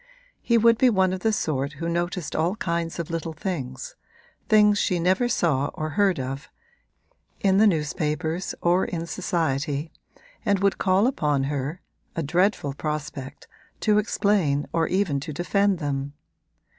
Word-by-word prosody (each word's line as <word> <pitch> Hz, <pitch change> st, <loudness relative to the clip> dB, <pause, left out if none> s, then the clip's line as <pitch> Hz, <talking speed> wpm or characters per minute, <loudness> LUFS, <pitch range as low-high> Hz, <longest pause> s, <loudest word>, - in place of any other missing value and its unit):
He 235 Hz, -, +3 dB
would 230 Hz, 0 st, +4 dB
be 255 Hz, -, +6 dB
one 190 Hz, -4 st, +2 dB
of 185 Hz, -, -3 dB
the 220 Hz, +3 st, +1 dB
sort 145 Hz, -8 st, -1 dB
who 165 Hz, +4 st, -5 dB
noticed 175 Hz, 0 st, -2 dB
all 170 Hz, +5 st, +1 dB
kinds 170 Hz, -6 st, -2 dB
of 170 Hz, -1 st, -4 dB
little 165 Hz, 0 st, -3 dB
things 135 Hz, -7 st, -5 dB, 0.5 s
things 210 Hz, -1 st, +5 dB
she 180 Hz, -2 st, +1 dB
never 185 Hz, +8 st, +2 dB
saw 145 Hz, -, +1 dB
or 155 Hz, 0 st, -3 dB
heard 190 Hz, +1 st, +2 dB
of 135 Hz, +2 st, -5 dB, 0.9 s
in 195 Hz, 0 st, +3 dB
the 220 Hz, -, +6 dB
newspapers 160 Hz, 0 st, -1 dB
or 175 Hz, +2 st, +3 dB
in 170 Hz, -1 st, -3 dB
society, 155 Hz, -3 st, -2 dB, 0.5 s
and 205 Hz, -3 st, +2 dB
would 195 Hz, 0 st, +1 dB
call 190 Hz, +2 st, +3 dB
upon 150 Hz, -, +1 dB
her 145 Hz, +4 st, -3 dB, 0.3 s
(a 165 Hz, -, -1 dB
dreadful 170 Hz, -1 st, +1 dB
prospect) 145 Hz, -2 st, -5 dB, 0.3 s
to 210 Hz, -1 st, +4 dB
explain 195 Hz, -9 st, +1 dB
or 165 Hz, -1 st, +2 dB
even 185 Hz, -7 st, 0 dB
to 140 Hz, -, -6 dB
defend 200 Hz, +4 st, +1 dB
them. 140 Hz, -2 st, -3 dB
170 Hz, 150 wpm, -25 LUFS, 145-195 Hz, 0.9 s, be